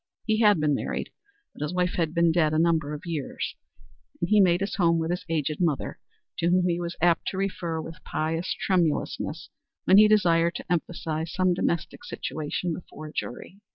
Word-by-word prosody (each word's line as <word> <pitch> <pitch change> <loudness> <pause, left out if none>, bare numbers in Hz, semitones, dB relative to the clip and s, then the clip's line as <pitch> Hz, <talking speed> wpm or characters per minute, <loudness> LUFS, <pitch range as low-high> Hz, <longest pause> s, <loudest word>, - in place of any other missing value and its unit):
He 220 -1 +1
had 210 -6 +5
been 150 -1 +2
married, - - -3 0.4
but - - -13
his 150 +4 -2
wife 180 0 +1
had 165 -3 0
been 170 0 +4
dead 160 -2 +2
a - - +2
number 160 -3 +2
of 150 - -10
years, 160 -5 -3 0.7
and 170 - -1
he 215 - +6
made 180 -1 +4
his 200 - -2
home 170 -3 +3
with 165 +1 -1
his 180 +1 -2
aged 155 -2 -1
mother, 160 -6 -1 0.4
to 170 - +1
whom 180 0 +3
he 175 -1 0
was 175 0 -4
apt 170 -1 +3
to 190 - -2
refer 180 -4 -2
with 165 +1 -8
pious 165 +3 -2
tremulousness 175 -5 0 0.4
when 190 - +6
he 215 - +8
desired 170 -5 +3
to - - -6
emphasize 160 -2 -2
some 185 -1 +2
domestic 170 -1 -2
situation 160 +3 -3
before 155 -2 -9
a - - -14
jury. 185 +10 -6
170 Hz, 190 wpm, -26 LUFS, 160-180 Hz, 0.7 s, he